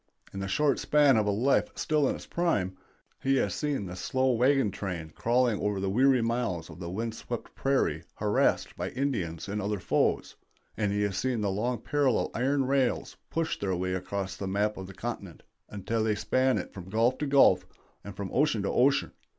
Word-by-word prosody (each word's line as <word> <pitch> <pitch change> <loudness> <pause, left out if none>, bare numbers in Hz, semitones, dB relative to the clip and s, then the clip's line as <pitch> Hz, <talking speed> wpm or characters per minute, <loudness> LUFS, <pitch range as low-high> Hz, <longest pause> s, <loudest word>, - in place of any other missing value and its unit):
In 95 - -5
the 95 - -3
short 140 +8 +2
span 145 -3 +4
of 110 -2 +2
a - - +2
life 125 - +2
still 150 -3 +1
in - - -1
its - - -9
prime, 100 - 0 0.5
he 135 0 +2
has 130 - +1
seen 145 -8 -2
the 90 -1 -7
slow 130 +7 0
wagon 125 -1 +3
train 90 -5 -5
crawling 120 +2 +1
over 105 -1 0
the 95 0 -1
weary 130 +2 +4
miles 115 -7 -2
of - - -12
wind 100 +6 -4
swept 120 +1 -6
prairie 135 0 0
harassed - - +1
by - - -3
Indians 100 - -2
and 105 +1 -2
other 105 +1 -1
foes, - - 0 0.4
and 105 -2 0
he 105 0 0
has 100 -2 -1
seen 125 0 0
the 100 -2 0
long 120 +5 -1
parallel 140 -5 +1
iron 135 +3 +1
rails 135 -1 0
push 165 0 -2
their 95 -2 -1
way 90 +1 -2
across 95 +1 -3
the 100 0 -5
map 105 +2 0
of 95 -1 -7
the 95 - -11
continent 100 -7 -6 0.3
until 105 +3 -2
they 110 -1 +1
span 130 +4 +1
it - - -5
from 95 -1 -9
gulf 115 +5 +2
to 150 - -1
gulf 95 -10 +5 0.4
and 100 0 -9
from 100 -1 -5
ocean 130 -7 +2
to 100 - 0
ocean. 135 +3 +3
110 Hz, 200 wpm, -28 LUFS, 95-130 Hz, 0.5 s, gulf